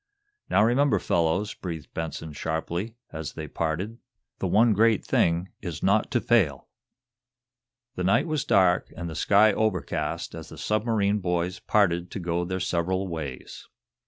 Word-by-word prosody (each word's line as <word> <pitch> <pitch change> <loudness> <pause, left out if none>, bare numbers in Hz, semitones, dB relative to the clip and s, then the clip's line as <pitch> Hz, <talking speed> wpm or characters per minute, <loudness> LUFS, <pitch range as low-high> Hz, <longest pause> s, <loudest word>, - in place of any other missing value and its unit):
"Now, - - +4
remember, 125 +1 +3
fellows," 90 +4 0
breathed 80 -5 -7
Benson, 80 -1 -5
sharply, 85 +8 -3 0.2
as 80 -2 -5
they - - -6
parted, 90 +9 -3 0.4
"the 95 - -1
one 110 +5 +4
great 110 +1 +3
thing 85 +3 +1
is 85 -5 -6
not 100 +3 +3
to 130 - +1
fail!" 105 - +1 1.2
The 90 - -3
night 95 - +3
was 155 -4 -1
dark 90 -2 +3
and 85 - -4
the 80 - -5
sky 105 +5 +4
overcast 110 -5 -1
as - - -8
the - - -11
submarine 105 -1 +1
boys 90 -1 -1
parted 90 -4 +1
to - - -5
go 85 0 -1
their 95 +1 -3
several 95 +2 -1
ways. 75 -7 -7
95 Hz, 150 wpm, -26 LUFS, 85-105 Hz, 1.2 s, Now